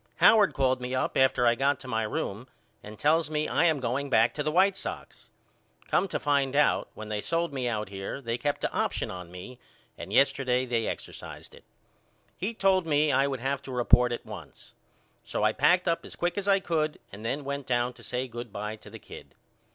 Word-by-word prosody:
Howard 215 Hz, -3 st, +5 dB
called 130 Hz, -1 st, +1 dB
me 125 Hz, +1 st, -3 dB
up 130 Hz, -, -1 dB
after 130 Hz, -2 st, +3 dB
I 120 Hz, -, +5 dB
got 135 Hz, +3 st, +1 dB
to 130 Hz, -, -10 dB
my 110 Hz, -3 st, 0 dB
room 110 Hz, +2 st, -3 dB, 0.3 s
and 105 Hz, +1 st, -10 dB
tells 155 Hz, +4 st, +2 dB
me 155 Hz, 0 st, -1 dB
I -, -, +2 dB
am 160 Hz, -4 st, +3 dB
going 130 Hz, +3 st, -2 dB
back 115 Hz, -2 st, +4 dB
to 150 Hz, -, -3 dB
the 155 Hz, +1 st, 0 dB
White 190 Hz, +4 st, +4 dB
Sox. -, -, -8 dB, 0.6 s
Come -, -, +2 dB
to -, -, -3 dB
find 140 Hz, -2 st, +1 dB
out, 150 Hz, -, +3 dB
when 110 Hz, 0 st, -8 dB
they 105 Hz, -1 st, -2 dB
sold 165 Hz, +2 st, -1 dB
me 130 Hz, -2 st, -2 dB
out 105 Hz, -4 st, -2 dB
here 95 Hz, +6 st, -5 dB
they 115 Hz, -3 st, -3 dB
kept 145 Hz, -1 st, -2 dB
a -, -, 0 dB
option -, -, -1 dB
on 90 Hz, -2 st, -8 dB
me 95 Hz, +8 st, -10 dB, 0.4 s
and -, -, -7 dB
yesterday 130 Hz, -2 st, +2 dB
they 115 Hz, -3 st, -1 dB
exercised -, -, -7 dB
it. -, -, -15 dB, 0.7 s
He 210 Hz, +6 st, -3 dB
told 190 Hz, -4 st, +2 dB
me 150 Hz, -1 st, +3 dB
I 135 Hz, +1 st, +3 dB
would 135 Hz, -3 st, -3 dB
have 135 Hz, +1 st, -1 dB
to 135 Hz, -, -9 dB
report 125 Hz, 0 st, +4 dB
at 120 Hz, -, -4 dB
once. -, -, -11 dB, 0.5 s
So -, -, -3 dB
I -, -, +3 dB
packed 180 Hz, 0 st, +3 dB
up 165 Hz, -, +1 dB
as -, -, -10 dB
quick 175 Hz, 0 st, -1 dB
as 200 Hz, -1 st, -3 dB
I 195 Hz, -1 st, +5 dB
could 155 Hz, -4 st, -1 dB
and 100 Hz, +3 st, -10 dB
then 140 Hz, +6 st, -2 dB
went 140 Hz, 0 st, -4 dB
down 120 Hz, 0 st, +1 dB
to -, -, -17 dB
say 125 Hz, +1 st, -3 dB
good 120 Hz, -1 st, -8 dB
by 105 Hz, +2 st, -5 dB
to -, -, -14 dB
the -, -, -9 dB
kid. -, -, -13 dB
135 Hz, 220 wpm, -28 LUFS, 120-155 Hz, 0.7 s, Howard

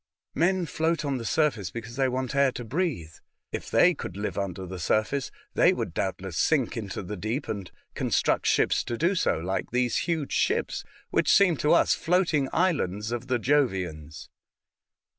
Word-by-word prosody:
'* -, -, -67 dB
Men 180 Hz, +1 st, +2 dB
float 160 Hz, 0 st, -1 dB
on 135 Hz, -3 st, -1 dB
the 115 Hz, -, -6 dB
surface 115 Hz, -, +1 dB
because 115 Hz, +2 st, -7 dB
they 135 Hz, -1 st, +2 dB
want 130 Hz, 0 st, -2 dB
air 140 Hz, -1 st, +3 dB
to 120 Hz, -, -6 dB
breathe. 125 Hz, -, -2 dB, 0.4 s
If -, -, -5 dB
they -, -, +5 dB
could 90 Hz, -, -7 dB
live 105 Hz, -, -3 dB
under 95 Hz, -2 st, -3 dB
the 90 Hz, 0 st, -7 dB
surface, 110 Hz, -, 0 dB, 0.2 s
they -, -, +5 dB
would -, -, -4 dB
doubtless 95 Hz, -3 st, -3 dB
sink 140 Hz, -, +2 dB
into 105 Hz, -4 st, -5 dB
the 105 Hz, +4 st, -5 dB
deep, 110 Hz, -, -3 dB
and 100 Hz, -4 st, -4 dB, 0.2 s
construct -, -, +1 dB
ships -, -, +2 dB
to 120 Hz, -, -3 dB
do 170 Hz, +7 st, +2 dB
so, 180 Hz, -, +1 dB
like 90 Hz, +4 st, -3 dB
these 125 Hz, 0 st, +1 dB
huge 160 Hz, -5 st, -1 dB
ships, -, -, 0 dB, 0.3 s
which -, -, +2 dB
seem 190 Hz, -4 st, +5 dB
to 150 Hz, -, +3 dB
us 170 Hz, -, +4 dB
floating 165 Hz, -5 st, +1 dB
islands 115 Hz, -, 0 dB
of 120 Hz, -1 st, -4 dB
the 130 Hz, -2 st, +1 dB
Jovians." 95 Hz, -, -1 dB
120 Hz, 180 wpm, -27 LUFS, 100-150 Hz, 0.4 s, they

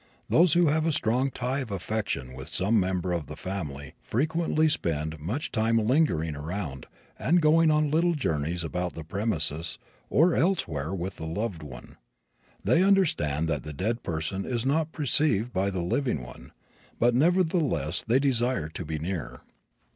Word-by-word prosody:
Those 170 Hz, -1 st, +5 dB
who 175 Hz, 0 st, +4 dB
have 155 Hz, +2 st, +1 dB
a -, -, +3 dB
strong 125 Hz, 0 st, +1 dB
tie 130 Hz, +1 st, -2 dB
of 130 Hz, -5 st, -5 dB
affection 95 Hz, -9 st, -3 dB
with 65 Hz, +5 st, -8 dB
some 105 Hz, +4 st, +2 dB
member 90 Hz, -1 st, -1 dB
of 85 Hz, -6 st, -3 dB
the -, -, -7 dB
family 75 Hz, -8 st, -5 dB
frequently 160 Hz, +4 st, +1 dB
spend 80 Hz, -, -1 dB
much 110 Hz, -, -3 dB
time 115 Hz, 0 st, +2 dB
lingering 110 Hz, -, +2 dB
around 75 Hz, -3 st, -5 dB, 0.3 s
and 175 Hz, +2 st, +3 dB
going 160 Hz, +1 st, +4 dB
on 150 Hz, -1 st, +2 dB
little 170 Hz, +2 st, +2 dB
journeys 80 Hz, -, -1 dB
about 90 Hz, +2 st, -3 dB
the 80 Hz, -, -7 dB
premises 80 Hz, -4 st, -1 dB, 0.3 s
or 165 Hz, +4 st, +4 dB
elsewhere 85 Hz, -, 0 dB
with 95 Hz, 0 st, -4 dB
the 80 Hz, -, -5 dB
loved 95 Hz, 0 st, -3 dB
one. 65 Hz, -5 st, -10 dB, 0.7 s
They 165 Hz, -, +3 dB
understand 155 Hz, -, +2 dB
that 75 Hz, -4 st, 0 dB
the 75 Hz, +2 st, -7 dB
dead 110 Hz, -, -1 dB
person 85 Hz, +4 st, -3 dB
is 120 Hz, +1 st, -2 dB
not 155 Hz, +3 st, +1 dB
perceived 130 Hz, -7 st, +1 dB
by 95 Hz, +2 st, +1 dB
the 95 Hz, -2 st, -2 dB
living 90 Hz, -, -1 dB
one, -, -, -11 dB, 0.5 s
but 120 Hz, +1 st, +4 dB
nevertheless 155 Hz, -, +2 dB
they 120 Hz, +3 st, +4 dB
desire 125 Hz, -, +1 dB
to 85 Hz, -, -6 dB
be 80 Hz, 0 st, -4 dB
near. 80 Hz, -2 st, -5 dB
100 Hz, 160 wpm, -27 LUFS, -, 0.7 s, Those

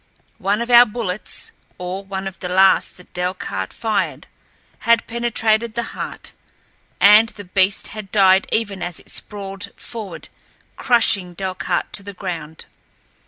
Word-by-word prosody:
One 205 Hz, +4 st, +1 dB
of 240 Hz, -, -5 dB
our 240 Hz, 0 st, +9 dB
bullets, 210 Hz, -3 st, -3 dB, 0.3 s
or 180 Hz, +2 st, -5 dB
one 195 Hz, 0 st, -4 dB
of 190 Hz, -, -8 dB
the 180 Hz, -, -5 dB
last 190 Hz, +1 st, +4 dB
that 180 Hz, -, -18 dB
Delcarte 180 Hz, -, -3 dB
fired, 220 Hz, -2 st, -2 dB, 0.5 s
had 230 Hz, -1 st, +3 dB
penetrated 230 Hz, -1 st, 0 dB
the 235 Hz, -, 0 dB
heart, -, -, -7 dB, 0.7 s
and 210 Hz, +3 st, +7 dB
the 205 Hz, -, -9 dB
beast 190 Hz, +1 st, +1 dB
had 210 Hz, -3 st, -8 dB
died 190 Hz, -2 st, +5 dB
even 205 Hz, -4 st, -1 dB
as 175 Hz, -1 st, -3 dB
it -, -, -12 dB
sprawled 195 Hz, -1 st, -5 dB
forward 210 Hz, -7 st, -8 dB, 0.5 s
crushing 200 Hz, -7 st, +2 dB
Delcarte 185 Hz, -2 st, -2 dB
to -, -, +2 dB
the 200 Hz, +1 st, -9 dB
ground. 165 Hz, -5 st, -6 dB
195 Hz, 140 wpm, -20 LUFS, 185-220 Hz, 0.7 s, our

